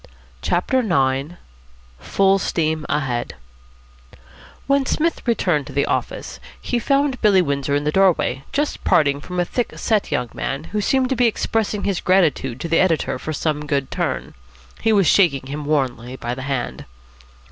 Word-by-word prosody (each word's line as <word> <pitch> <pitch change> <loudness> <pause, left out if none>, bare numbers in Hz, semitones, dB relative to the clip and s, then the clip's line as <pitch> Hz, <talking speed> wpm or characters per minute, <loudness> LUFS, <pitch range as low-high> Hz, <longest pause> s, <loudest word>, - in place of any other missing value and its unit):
CHAPTER 180 +9 +1
IX 140 - +1 0.7
FULL 195 - +2
STEAM 160 -4 -1
AHEAD 125 -5 -1 1.3
When 275 0 +2
Psmith 325 +5 0
returned 175 - +1
to - - -9
the 140 - +1
office, - - -3 0.2
he 245 - -1
found 275 +1 +1
Billy 205 -3 +5
Windsor 140 -4 0
in 145 - 0
the 150 - 0
doorway, 175 -8 +2
just 295 +1 -2
parting 140 -2 +3
from 180 +4 -5
a 175 - +2
thick 245 +6 -3
set 215 -3 0
young 125 -1 -1
man, 135 +2 -3
who 210 - 0
seemed 260 +4 +1
to 265 - +1
be 245 0 +3
expressing 220 -2 -1
his 195 -3 -1
gratitude 155 -9 +2
to - - -3
the 165 - +2
editor 170 -4 +1
for 155 - -5
some 150 -1 -2
good 140 -3 -1
turn. - - -2 0.5
He 225 - +2
was 200 -3 +4
shaking 155 -8 +3
him 145 +2 -5
warmly 130 -4 -1
by 120 -2 -4
the 130 - -6
hand. 120 - -3
165 Hz, 165 wpm, -21 LUFS, 140-210 Hz, 1.3 s, Billy